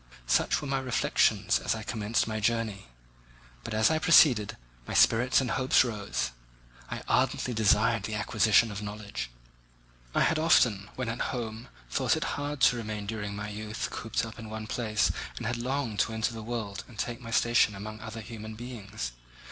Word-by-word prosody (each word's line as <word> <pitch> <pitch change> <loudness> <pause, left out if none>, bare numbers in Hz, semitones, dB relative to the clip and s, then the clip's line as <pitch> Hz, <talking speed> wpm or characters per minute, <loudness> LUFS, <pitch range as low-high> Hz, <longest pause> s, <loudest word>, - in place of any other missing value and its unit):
Such - - +2
were 145 - -6
my 135 0 0
reflections 130 -2 +2
as - - -1
I - - -6
commenced 110 0 0
my 110 -1 -2
journey; 110 - -1 0.8
but 110 - -4
as 110 +7 +4
I 160 - +2
proceeded, 135 - +5 0.3
my - - -4
spirits 120 +3 +5
and 130 -4 -1
hopes 130 0 +4
rose. 105 - -3 0.6
I - - -5
ardently 125 - +1
desired 110 +1 +3
the 105 +1 -4
acquisition 110 +1 +3
of 100 0 -5
knowledge. 105 -8 -5 0.9
I - - +3
had 160 - +3
often, 110 -11 +3
when 130 -2 -3
at 115 +1 -3
home, 115 -1 -5 0.2
thought - - +2
it - - -2
hard 145 -1 -4
to 125 - +5
remain 105 -2 -4
during 105 -1 -4
my 105 +1 -5
youth 105 +1 -4
cooped 115 +1 -2
up 115 0 -10
in 110 -1 -8
one 110 0 -5
place 110 -3 0 0.3
and - - -5
had 120 +2 -1
longed 125 -3 -2
to 115 - +1
enter 110 +1 -1
the 115 - -6
world 110 -3 -4
and 120 - -15
take 115 +3 -3
my 115 - -8
station 115 -2 +3
among 110 +2 -7
other 110 0 -7
human 110 0 -8
beings. 110 - -6
110 Hz, 180 wpm, -29 LUFS, 105-120 Hz, 0.9 s, proceeded